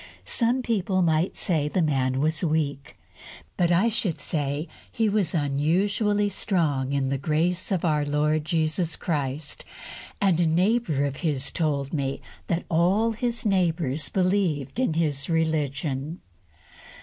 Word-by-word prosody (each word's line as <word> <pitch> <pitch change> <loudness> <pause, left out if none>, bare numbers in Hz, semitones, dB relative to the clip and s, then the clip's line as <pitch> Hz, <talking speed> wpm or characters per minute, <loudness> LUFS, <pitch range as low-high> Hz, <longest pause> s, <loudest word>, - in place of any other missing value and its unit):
Some 245 +2 +1
people 195 -5 +1
might 165 +2 +1
say 155 -5 +1
the 185 - -1
man 130 -3 +1
was 155 +3 +1
weak, 150 -4 -1 0.6
but 175 -1 +2
I 180 +6 +4
should 210 -7 -1
say 145 +1 -2 0.2
he 225 -1 +1
was 200 -5 +1
unusually 190 +9 +1
"strong 155 -9 0
in 140 -1 0
the 135 0 -1
grace 170 +6 0
of 185 -3 0
our 150 -3 +2
Lord 150 +1 +1
Jesus 160 +1 0
Christ," 145 -2 -3 0.6
and 190 -4 +2
a 170 - +3
neighbour 175 - +2
of 140 -1 -3
his 140 -5 -1
told 145 -4 -1
me 135 -3 -1 0.3
that 170 0 -1
all 185 +7 +2
his 235 +2 -3
neighbours 165 -7 +1
believed 185 - 0
in 255 -12 +1
his 150 -3 +1
religion. 155 -1 -1
160 Hz, 135 wpm, -25 LUFS, 145-185 Hz, 0.6 s, I